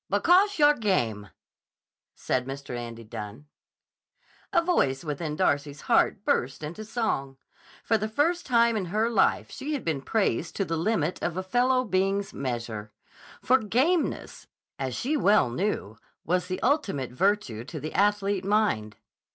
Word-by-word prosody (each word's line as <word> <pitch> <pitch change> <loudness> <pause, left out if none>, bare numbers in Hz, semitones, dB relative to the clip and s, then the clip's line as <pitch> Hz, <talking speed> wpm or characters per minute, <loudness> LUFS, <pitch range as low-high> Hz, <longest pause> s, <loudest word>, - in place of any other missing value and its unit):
"Because 360 - +4
yah'r 295 -1 +6
game," 115 - 0 0.9
said 125 0 -1
Mr. 135 -2 -6
Andy 115 -1 -7
Dunne. 110 +3 -8 1.1
A 365 - +4
voice 175 - +1
within 150 0 -3
Darcy's 145 -1 0
heart - - +2
burst 135 +5 0
into 170 +8 -6
song. 215 - -2 0.5
For 225 - +2
the 215 - -1
first 335 +9 0
time 235 -2 +4
in 205 -4 -1
her 215 +6 0
life 210 - +2
she 300 +3 -4
had 285 - -4
been 155 -5 -1
praised 165 - -1
to 195 - 0
the 165 - -2
limit 170 -1 0
of 175 0 -2
a 185 - -2
fellow 250 +5 +2
being's 195 -1 0
measure. 115 -5 -4 0.5
For 260 +2 +4
gameness, 265 - 0 0.3
as 130 -2 -3
she 290 +5 -1
well 205 - +3
knew, 120 - -2 0.3
was 180 +1 0
the 185 0 -3
ultimate 205 - 0
virtue 175 - 0
to 155 +3 -7
the 155 +3 -6
athlete 200 -1 +1
mind. 195 - 0
185 Hz, 150 wpm, -27 LUFS, 135-225 Hz, 1.1 s, yah'r